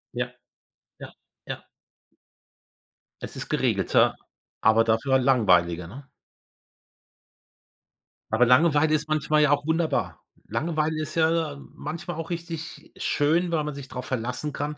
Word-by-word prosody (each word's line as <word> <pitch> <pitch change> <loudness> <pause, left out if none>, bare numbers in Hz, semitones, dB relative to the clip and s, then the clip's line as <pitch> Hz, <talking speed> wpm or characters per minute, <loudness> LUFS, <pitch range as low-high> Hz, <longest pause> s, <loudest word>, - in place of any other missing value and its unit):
Ja, - - -3 0.7
ja, - - -10 0.3
ja. - - -7 1.5
Es - - -7
ist - - -5
geregelter, - - +2 0.4
aber 115 0 +4
dafür 115 +4 +2
langweiliger, 90 -10 +3
ne? 135 +8 -12 2.2
Aber 115 +3 +4
Langeweile 150 +4 +4
ist 150 +1 -2
manchmal 155 0 +2
ja 150 - +3
auch 145 0 +1
wunderbar. 160 0 0 0.3
Langweile 155 -1 -1
ist 155 - -6
ja 160 -2 +1 0.2
manchmal 170 +2 -6
auch 165 +1 -5
richtig 165 -2 -6
schön, 165 +4 +1
weil 155 -2 +1
man 150 -1 -4
sich 140 -2 -8
drauf 125 0 -7
verlassen 125 +4 -3
kann, 145 +1 -4
150 Hz, 120 wpm, -25 LUFS, 125-160 Hz, 2.2 s, aber